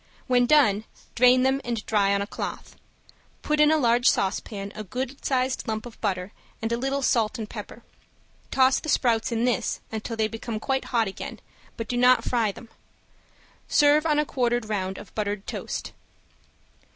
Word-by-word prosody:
When 245 -1 +3
done 220 -8 +4 0.3
drain 250 +1 +5
them 265 +1 +2
and 235 -2 -3
dry 200 -2 +2
on 200 0 +1
a - - -4
cloth. - - -6 0.7
Put 300 0 0
in 300 0 +6
a 315 - +4
large 245 -2 +4
saucepan 200 +1 -2
a 215 - -6
good 255 +6 -5
sized 260 -1 0
lump 220 0 -3
of 240 - -12
butter 190 -2 -2 0.3
and 225 -1 -3
a - - +2
little 270 +2 -1
salt 225 -2 +1
and 220 -2 -5
pepper. - - -9 0.7
Toss 260 0 +4
the 315 - -6
sprouts 230 -4 +2
in 230 +1 0
this 245 -6 0
until 225 +1 -4
they 220 -1 +2
become 225 0 -5
quite 265 +3 -1
hot 230 -4 +1
again, 195 - -7 0.4
but 230 -2 -4
do 245 - -2
not 250 +1 +5
fry 230 -4 +1
them. 230 +3 -13 1.0
Serve 295 +2 +4
on 300 -2 +2
a 300 - +2
quartered 240 -4 0
round 190 -3 -2
of 205 - -11
buttered 205 -1 -3
toast. - - -5
235 Hz, 175 wpm, -25 LUFS, 215-260 Hz, 1.0 s, in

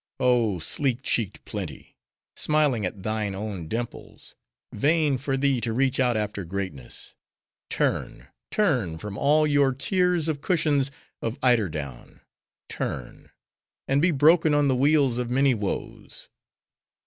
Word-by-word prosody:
Oh, 120 -6 +2
sleek 130 - -1
cheeked 110 -6 -1
Plenty! - - -7 0.4
smiling 145 -9 +2
at 95 +1 -9
thine 110 -2 -2
own 100 -5 -5
dimples;—vain 130 - -3
for 135 0 -1
thee 135 -2 +1
to 115 -1 -1
reach 130 +2 +1
out 125 -3 +3
after 105 -2 -3
greatness. 90 -8 -5 0.6
Turn! - - -2 0.2
turn! 125 - +1
from 100 +4 -7
all 150 +6 +3
your 145 -2 +3
tiers 180 +2 +1
of 150 -3 -2
cushions 150 -6 +1 0.3
of 115 +4 -3
eider 120 -7 +4
down—turn! 70 -2 -8 0.6
and 135 +1 +2
be 175 - +4
broken 155 +1 +4
on 145 -1 +3
the 130 - +2
wheels 140 -2 +3
of 120 -1 -2
many 135 +2 +3
woes. 105 -4 -5
125 Hz, 125 wpm, -25 LUFS, 105-145 Hz, 0.6 s, eider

